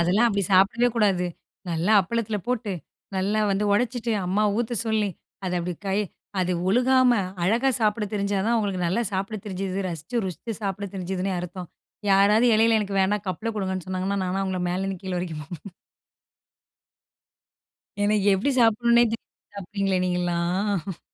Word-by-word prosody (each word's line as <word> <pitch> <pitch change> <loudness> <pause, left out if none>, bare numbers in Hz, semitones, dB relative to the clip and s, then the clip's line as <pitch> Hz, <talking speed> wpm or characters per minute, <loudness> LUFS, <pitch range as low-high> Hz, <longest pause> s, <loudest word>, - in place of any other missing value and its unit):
அதெல்லாம் 195 +8 +3
அப்படி 200 -2 0
சாப்பிடவே 210 +6 +4
கூடாது. 195 -5 +2 0.4
நல்லா 170 +6 +1
அப்பளத்தில 220 +2 -2
போட்டு, 240 -4 -1 0.4
நல்லா 205 +3 +1
வந்து 200 +2 +1
உடைச்சிட்டு 240 +1 0
அம்மா 200 +4 +1 0.2
ஊத்த 240 0 -1
சொல்லி, 215 -2 +1 0.3
அதை 180 -1 -1
அப்படி 175 0 -3
கை 195 +2 +1 0.4
அது 180 0 +1 0.2
ஒழுகாம, 255 +3 +4 0.3
அழகா 235 +9 +3
சாப்பிட 210 0 +1
தெரிஞ்சா 200 0 0
தான் 235 - +2
அவங்களுக்கு 195 -5 -1
நல்லா 190 +8 +1
சாப்பிடத் 195 +2 -3
தெரிஞ்சுது 190 0 -3
ரசிச்சு, 165 +7 -5
ருசித்து 205 +5 -5
சாப்பிட 200 0 -2
தெரிஞ்சிதுன்னே 190 +1 -2
அர்த்தம். 180 0 -6 0.4
யாராவது 200 +4 +5
இலையில 225 +1 +4
எனக்கு 200 -1 -2
வேணா 190 +2 +2
கப்பில 220 +5 -2
கொடுங்கன்னு 190 -2 -2
சொன்னாங்கன்னா, 190 +2 -1
நானா 185 +2 -1
அவங்களை 190 -1 -2
மேலேருந்து 190 0 -2
கீழ 185 -1 -3
வரைக்கும் 165 -4 -4
பார்ப்பேன். 175 +4 -10 2.3
எனக்கு 205 -1 +2
எப்படி 205 +9 0
சாப்பிடணுன்னே, 235 +1 +5
தெரியாது 230 - -10
சாப்பிட்டீங்களே 195 -1 -1
நீங்கள்லாம்? 180 +1 -1
195 Hz, 140 wpm, -25 LUFS, 185-220 Hz, 2.3 s, யாராவது